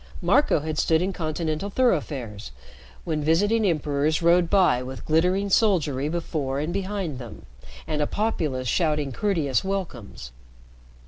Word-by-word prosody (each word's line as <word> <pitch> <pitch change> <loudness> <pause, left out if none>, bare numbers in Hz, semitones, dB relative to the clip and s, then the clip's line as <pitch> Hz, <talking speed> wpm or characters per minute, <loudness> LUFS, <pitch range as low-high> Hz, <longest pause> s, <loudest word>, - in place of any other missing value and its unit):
Marco 285 - +3
had 155 0 -3
stood 160 -1 +3
in 190 +3 -1
continental 160 +2 -3
thoroughfares 145 - -1 0.5
when 155 -3 -2
visiting 205 +9 +2
emperors 155 -3 0
rode 170 0 +4
by 185 -11 +3
with 130 +1 -8
glittering 180 +5 +2
soldiery 160 - +2
before 150 -5 -2
and 155 +4 -2
behind 190 -7 -3
them, 120 -3 -10 0.4
and 150 -1 -2
a 145 - +1
populace 155 - -2
shouting 150 -1 0
courteous 155 - 0
welcomes. 135 - -5
160 Hz, 130 wpm, -24 LUFS, 145-190 Hz, 0.5 s, rode